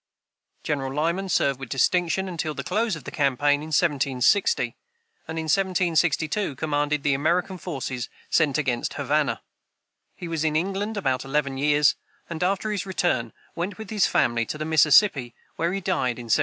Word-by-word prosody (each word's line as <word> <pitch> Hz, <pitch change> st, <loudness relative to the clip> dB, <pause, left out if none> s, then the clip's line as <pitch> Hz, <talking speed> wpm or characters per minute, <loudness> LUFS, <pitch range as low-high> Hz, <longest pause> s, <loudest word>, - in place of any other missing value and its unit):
General 135 Hz, -3 st, -2 dB
Lyman 170 Hz, +7 st, -1 dB
served 140 Hz, -6 st, +1 dB
with 135 Hz, -3 st, -8 dB
distinction 180 Hz, +8 st, +1 dB
until 160 Hz, -4 st, -3 dB
the 140 Hz, -, -4 dB
close 210 Hz, -, 0 dB
of 160 Hz, -, -10 dB
the -, -, -7 dB
campaign 145 Hz, +1 st, +2 dB
in 155 Hz, -, -7 dB
1760, 150 Hz, -, +2 dB, 0.5 s
and 160 Hz, -, -5 dB
in 160 Hz, -, -2 dB
1762 175 Hz, -1 st, +1 dB
commanded 145 Hz, 0 st, -1 dB
the 145 Hz, -, +2 dB
American 175 Hz, +6 st, 0 dB
forces 130 Hz, -7 st, -4 dB, 0.2 s
sent 155 Hz, -4 st, +2 dB
against 130 Hz, -5 st, -1 dB
Havana. -, -, 0 dB, 0.7 s
He 175 Hz, -, -7 dB
was 165 Hz, -2 st, -2 dB
in 155 Hz, -1 st, 0 dB
England 195 Hz, +6 st, -1 dB
about 130 Hz, -9 st, 0 dB
eleven 140 Hz, 0 st, -1 dB
years, 150 Hz, 0 st, +3 dB, 0.3 s
and, 165 Hz, -2 st, -6 dB
after 195 Hz, +4 st, 0 dB
his 200 Hz, -2 st, -3 dB
return, 150 Hz, -, 0 dB, 0.2 s
went 175 Hz, +4 st, -4 dB
with 220 Hz, -1 st, -9 dB
his 210 Hz, -3 st, +3 dB
family 120 Hz, 0 st, +2 dB
to -, -, -4 dB
the 155 Hz, -, -4 dB
Mississippi, 150 Hz, -, +4 dB, 0.2 s
where 170 Hz, +1 st, 0 dB
he 195 Hz, -, -2 dB
died 150 Hz, -10 st, 0 dB
in 120 Hz, -, -7 dB
1788. 115 Hz, -, +2 dB
155 Hz, 170 wpm, -24 LUFS, 140-180 Hz, 0.7 s, Mississippi